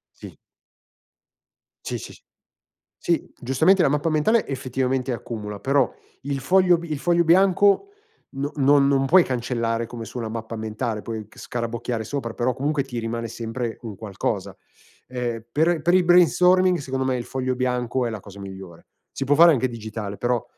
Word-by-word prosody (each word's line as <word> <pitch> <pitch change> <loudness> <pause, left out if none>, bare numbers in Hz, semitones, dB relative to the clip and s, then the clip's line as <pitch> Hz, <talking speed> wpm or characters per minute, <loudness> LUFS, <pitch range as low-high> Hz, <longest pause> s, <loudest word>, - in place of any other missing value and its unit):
Sì. - - -12 1.5
Sì, - - -3
sì, - - -9
sì. - - -18 0.8
Sì, 170 -2 -1
giustamente 160 +9 +3
la - - +4
mappa 150 +3 0
mentale 205 +9 +2
effettivamente 130 -1 -2
accumula, 105 -3 -5
però 135 +2 +2 0.3
il 140 0 -3
foglio 180 +4 +4
bi 170 -2 -8
il 150 - -1
foglio 170 0 +2
bianco 195 - +4 0.4
no 140 +1 -4
non 140 0 +4
non 135 -1 +2
puoi 180 +5 +6
cancellare 115 -2 -2
come 115 -1 -8
su 125 - -9
una 115 -2 -3
mappa 115 0 -5
mentale, 110 0 -3
puoi 110 -3 -6
c - - -22
scarabocchiare 115 -1 -4
sopra, 120 -3 -4
però 125 +1 0
comunque 145 +1 0
ti 125 -3 -7
rimane 115 0 -3
sempre 115 +1 -5
un 110 -4 -7
qualcosa. 100 -3 -4 0.5
Ehm, 120 -3 -4
per 160 +2 +2
per 175 - +3
il 185 -1 +5
brainstorming 180 +1 +5
secondo 130 -1 -3
me 130 -1 +1
il 120 - -5
foglio 130 -1 -2
bianco 125 0 -1
è - - -2
la 110 -2 -5
cosa 100 0 -13
migliore. 95 -3 -10 0.2
Si 135 - -4
può 145 +2 +2
fare 170 +2 +8
anche 130 -2 +1
digitale 110 -3 -6
però 120 -1 0
130 Hz, 170 wpm, -23 LUFS, 115-150 Hz, 1.5 s, fare